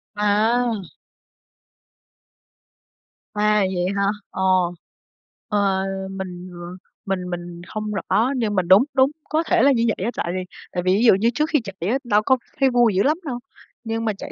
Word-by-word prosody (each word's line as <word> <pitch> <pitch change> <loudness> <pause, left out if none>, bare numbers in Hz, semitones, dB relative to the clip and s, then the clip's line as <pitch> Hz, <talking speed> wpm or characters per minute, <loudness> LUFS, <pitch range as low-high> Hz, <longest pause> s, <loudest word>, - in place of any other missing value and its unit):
À! 220 +4 +2 2.6
À, 210 0 +2
vậy 180 -1 -1
hả? 200 - +1 0.3
Ờ, - - -5 1.1
ờ, 195 -2 +1 0.3
mình, 185 -1 -7
ờ, 175 - -10 0.5
mình 185 -2 -2
mình 175 -1 -6
không 215 0 -4
rõ 225 +6 +1
nhưng 215 -4 -1
mà 185 - +2
đúng 190 +7 +6
đúng, 265 +1 +4 0.2
có 315 +2 +1
thể - - +2
là 280 - +6
như 235 -3 +2
vậy - - -3
á. 235 - -1
Tại 170 - -2
vì 185 - -2 0.3
tại 180 -1 -2
vì 185 0 +3
ví 220 - +1
dụ - - +8
như 225 +4 +2
trước 305 +4 +1
khi 300 - +3
chạy 195 -2 -5
á, 255 - +2
đâu 210 -4 +2
có 260 - +4 0.2
thấy 270 - +4
vui 240 -4 +3
dữ 195 - +3
lắm 305 +3 +2
đâu 245 -4 -3 0.4
nhưng 225 0 -3
mà 215 - +1
chạy - - -8
210 Hz, 180 wpm, -22 LUFS, 190-240 Hz, 2.6 s, dụ